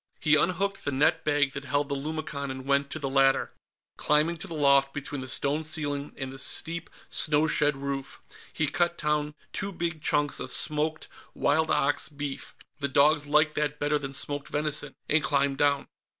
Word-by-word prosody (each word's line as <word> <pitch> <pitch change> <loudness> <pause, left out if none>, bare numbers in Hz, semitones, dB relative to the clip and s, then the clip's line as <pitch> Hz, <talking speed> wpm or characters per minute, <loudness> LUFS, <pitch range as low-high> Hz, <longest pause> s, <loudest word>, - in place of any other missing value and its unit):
He 155 -1 +4
unhooked 195 +5 0
the 145 - -1
net 160 +5 +2
bag 145 -2 +2
that 140 0 -6
held 145 +1 0
the 140 - -2
lumicon 140 -1 -4
and 130 0 -6
went 140 0 +1
to - - -5
the 140 -3 -3
ladder, 135 0 +3 0.5
climbing 155 +3 +2
to - - -7
the 165 - -6
loft 140 -2 +3
between 145 -1 -5
the 130 - -6
stone 140 +4 0
ceiling 145 -2 -2
and 135 -1 -5
the 135 - -6
steep 165 +4 +1 0.2
snow 150 0 +2
shed 150 -2 +2
roof; 135 -1 -5 0.3
he 155 - 0
cut 175 +3 0
down 150 0 -1 0.2
two 195 +1 -2
big 170 -3 -3
chunks 145 -1 +1
of - - -5
smoked 155 +1 -1 0.3
wild 160 +2 +2
ox 145 +1 +1
beef 145 -1 -6 0.2
the 140 - 0
dogs 145 +2 +3
liked 150 +1 +3
that 150 -1 -1
better 145 0 +1
than 135 -2 -5
smoked 145 +1 -3
venison 150 0 -2
and 155 0 +3
climbed 140 -1 +1
down. 140 -1 +2
145 Hz, 185 wpm, -27 LUFS, 140-155 Hz, 0.5 s, He